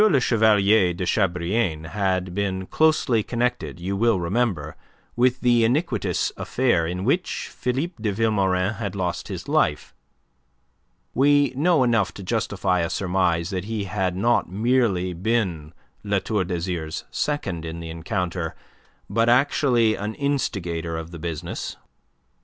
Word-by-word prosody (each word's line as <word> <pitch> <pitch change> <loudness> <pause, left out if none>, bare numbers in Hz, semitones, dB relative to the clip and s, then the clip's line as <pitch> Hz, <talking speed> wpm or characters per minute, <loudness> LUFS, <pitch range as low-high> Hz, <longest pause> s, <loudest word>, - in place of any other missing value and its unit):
Le 205 -11 +5
Chevalier 105 -5 +4
de 90 - -3
Chabrillane 90 -3 0
had 95 -2 -1
been 95 -1 -2
closely 155 -5 +2
connected, 120 -4 -2
you 95 +3 -3
will 115 -1 +2
remember, 85 -4 -1 0.4
with 125 +1 +2
the 120 -2 +4
iniquitous 140 +10 0
affair 120 -11 +1
in 90 +2 -3
which 175 +9 -1
Philippe 135 +4 -3
de 105 -2 0
Vilmorin 100 -2 +1
had 100 -4 -4
lost 90 -3 -2
his - - -6
life. 75 -1 +1 1.2
We 145 +1 +4
know 155 0 +3
enough 115 -5 +1
to 100 - -8
justify 95 -3 0
a 85 -1 0
surmise 90 -2 0
that 95 -1 -3
he 110 -1 -3
had 95 -2 -1
not 115 +2 +2
merely 100 -3 +1
been 90 -5 -1 0.3
La 100 -1 0
Tour 100 -1 -1
d'Azyr's 85 -3 -3
second 100 - -2
in 85 0 -6
the 80 -1 -6
encounter, 85 0 -3 0.5
but 115 +1 +2
actually 125 -3 +3
an 105 +1 -4
instigator 90 - -2
of 80 +1 -7
the 85 - -8
business. 85 +1 -5
100 Hz, 135 wpm, -24 LUFS, 90-120 Hz, 1.2 s, Le